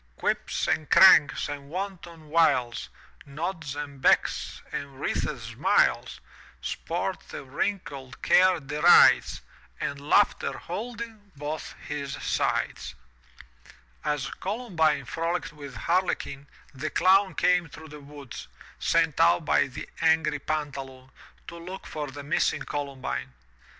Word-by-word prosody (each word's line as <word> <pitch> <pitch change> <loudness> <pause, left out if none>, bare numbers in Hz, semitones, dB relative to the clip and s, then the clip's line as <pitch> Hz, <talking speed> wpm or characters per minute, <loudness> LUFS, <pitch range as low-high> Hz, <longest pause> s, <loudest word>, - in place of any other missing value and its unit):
Quips - - -1
and 155 - 0
Cranks 170 -5 +7
and 140 -1 -7
wanton 170 -3 -6
Wiles,* 145 -7 +2 0.3
Nods 155 0 -5
and 145 -2 -7
Becks - - +1
and 140 -2 -6
wreathed - - -2
Smiles, - - +1 0.4
Sport 60 - -3
that - - -7
wrinkled 135 -3 -4
Care 185 -1 +5
derides. 150 +4 +5 0.4
And 140 0 -3
Laughter, 195 +8 +2
holding 220 +1 -7
both 150 +2 -5
his 145 -2 -4
sides! - - -2 1.1
As 145 -2 -2
Columbine 185 - 0
frolicked 165 +4 -3
with 140 -3 -10
Harlequin, 145 - -1 0.3
the 145 +3 -4
Clown 190 +5 +3
came 180 -2 +2
through 160 +1 -12
the 150 0 -10
woods, 140 -3 -10 0.3
sent 165 -3 +1
out 165 0 +4
by - - +3
the 130 - -8
angry 160 -2 +3
Pantaloon, 135 -3 -5 0.4
to 170 - -8
look 185 +3 -8
for 150 -1 -5
the 140 +1 -8
missing 145 - 0
Columbine. 130 - -4
150 Hz, 115 wpm, -27 LUFS, 140-175 Hz, 1.1 s, Cranks